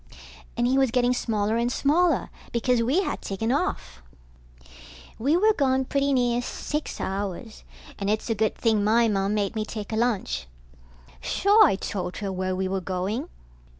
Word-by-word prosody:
And 240 Hz, -, +2 dB
he 260 Hz, +2 st, +3 dB
was 265 Hz, -2 st, +3 dB
getting 245 Hz, +1 st, +2 dB
smaller 220 Hz, -2 st, 0 dB
and 235 Hz, +1 st, 0 dB
smaller, 330 Hz, +7 st, +2 dB, 0.2 s
because 235 Hz, 0 st, +1 dB
we 275 Hz, +12 st, +2 dB
had -, -, -3 dB
taken 225 Hz, +4 st, -2 dB
off. 65 Hz, -, -2 dB, 1.2 s
We 285 Hz, +8 st, +2 dB
were 430 Hz, +4 st, +4 dB
gone 265 Hz, -5 st, +1 dB
pretty 280 Hz, +1 st, 0 dB
near 245 Hz, -2 st, +2 dB
six 300 Hz, +4 st, -4 dB
hours, 200 Hz, +3 st, -4 dB, 0.4 s
and 200 Hz, 0 st, -2 dB
it's 215 Hz, +1 st, -1 dB
a 230 Hz, -, +1 dB
good 220 Hz, 0 st, 0 dB
thing 220 Hz, -3 st, +1 dB
my 230 Hz, +3 st, +4 dB
Mom 200 Hz, -1 st, 0 dB
made 205 Hz, 0 st, -1 dB
me 215 Hz, -, -1 dB
take 215 Hz, 0 st, -6 dB
a -, -, 0 dB
lunch. 210 Hz, -, -1 dB, 0.7 s
Sure, 410 Hz, -, +4 dB
I -, -, +1 dB
told 185 Hz, -2 st, -4 dB
her 200 Hz, -2 st, -3 dB
where 185 Hz, 0 st, -2 dB
we 190 Hz, 0 st, -1 dB
were 190 Hz, 0 st, -2 dB
going. 185 Hz, +4 st, -3 dB
225 Hz, 170 wpm, -25 LUFS, 200-260 Hz, 1.2 s, were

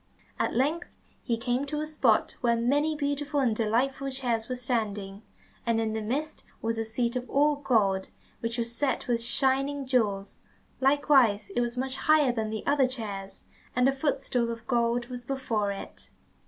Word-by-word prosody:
At -, -, 0 dB
length 295 Hz, +7 st, 0 dB, 0.3 s
he 235 Hz, -2 st, -1 dB
came 245 Hz, +4 st, -1 dB
to 300 Hz, +1 st, -2 dB
a 305 Hz, -, -1 dB
spot 280 Hz, -8 st, +2 dB
where 235 Hz, -2 st, +3 dB
many 285 Hz, +7 st, +1 dB
beautiful 285 Hz, 0 st, -1 dB
and 245 Hz, -5 st, +2 dB
delightful 250 Hz, +5 st, 0 dB
chairs 245 Hz, -4 st, -2 dB
were 255 Hz, -, -1 dB
standing, 210 Hz, -5 st, -2 dB, 0.4 s
and 230 Hz, -1 st, +1 dB
in 220 Hz, -1 st, 0 dB
the 220 Hz, -, -2 dB
midst 285 Hz, +8 st, -3 dB, 0.2 s
was 225 Hz, 0 st, -2 dB
a 225 Hz, -, -1 dB
seat 235 Hz, +2 st, -1 dB
all 295 Hz, +2 st, +3 dB
of 285 Hz, 0 st, -9 dB
gold 195 Hz, -7 st, +2 dB, 0.3 s
which 230 Hz, +1 st, -3 dB
was 235 Hz, 0 st, -1 dB
set 280 Hz, 0 st, -1 dB
with 235 Hz, -1 st, +1 dB
shining 270 Hz, +3 st, +1 dB
jewels, 210 Hz, -6 st, 0 dB, 0.4 s
likewise 265 Hz, -7 st, +4 dB
it 240 Hz, -, +2 dB
was 240 Hz, +1 st, -2 dB
much 260 Hz, +1 st, -2 dB
higher 300 Hz, -1 st, +4 dB
than 220 Hz, -2 st, -2 dB
the 220 Hz, 0 st, -4 dB
other 280 Hz, -2 st, +3 dB
chairs, 200 Hz, -6 st, -6 dB, 0.3 s
and 250 Hz, +1 st, +4 dB
a 270 Hz, -, +2 dB
footstool 265 Hz, -4 st, 0 dB
of 230 Hz, 0 st, -7 dB
gold 235 Hz, -1 st, +1 dB
was 245 Hz, 0 st, -7 dB
before 235 Hz, -6 st, -1 dB
it. 195 Hz, -, -9 dB
245 Hz, 175 wpm, -28 LUFS, 225-275 Hz, 0.4 s, likewise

